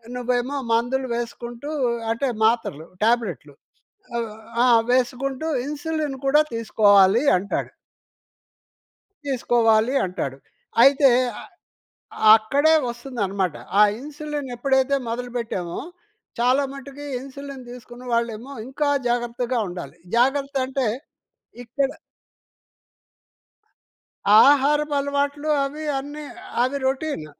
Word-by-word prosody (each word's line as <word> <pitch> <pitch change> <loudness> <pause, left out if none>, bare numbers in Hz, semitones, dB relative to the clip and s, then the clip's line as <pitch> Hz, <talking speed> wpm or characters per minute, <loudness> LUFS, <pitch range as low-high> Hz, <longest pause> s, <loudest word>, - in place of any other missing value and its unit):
నువ్వేమో 250 +2 -1 0.2
మందులు 250 +3 0
వేసుకుంటూ 240 +3 -6 0.4
అంటే 235 +5 -1 0.2
మాత్రలు 220 -9 0 0.2
టాబ్లెట్లు. 220 -11 0 1.1
ఆ! - - +4 0.3
వేసుకుంటూ 255 +4 0 0.2
ఇన్సులిన్ 300 -1 -3
కూడా 295 +3 +5
తీసుకోవాలి 210 -1 +4 0.2
అంటాడు. 200 +3 -3 1.5
తీసుకోవాలి 235 -3 +2
అంటాడు. 140 -7 -4 0.5
అయితే 275 0 +6 0.3
ఆహ్, - - -13 0.9
అక్కడే 280 +8 +2 0.2
వస్తుందన్నమాట. 200 - -3 0.2
ఆ - - +8 0.2
ఇన్సులిన్ 295 0 -6
ఎప్పుడైతే 265 +2 +2
మొదలు 245 +1 -4
పెట్టామో 185 -7 -4 0.6
చాలా 255 +4 +3
మటుకు 280 +1 -9
ఇన్సులిన్ 275 0 -9
తీసుకున్న 245 0 -11
వాళ్ళేమో 235 +2 -2 0.2
ఇంకా 285 +2 -1 0.2
జాగ్రత్తగా 240 +1 -1
ఉండాలి. 175 -1 -8 0.2
జాగ్రత్త 275 +3 +1
అంటే 265 0 -1 0.8
ఇక్కడ 265 +4 -1 2.6
ఆహారపు 290 +1 +3
అలవాట్లు 285 +1 -1
అవి 295 +3 -5 0.2
అన్ని 290 +2 -8 0.4
అవి 260 +3 -1
రొటీన్. 265 - -2
255 Hz, 90 wpm, -23 LUFS, 235-280 Hz, 2.6 s, ఆ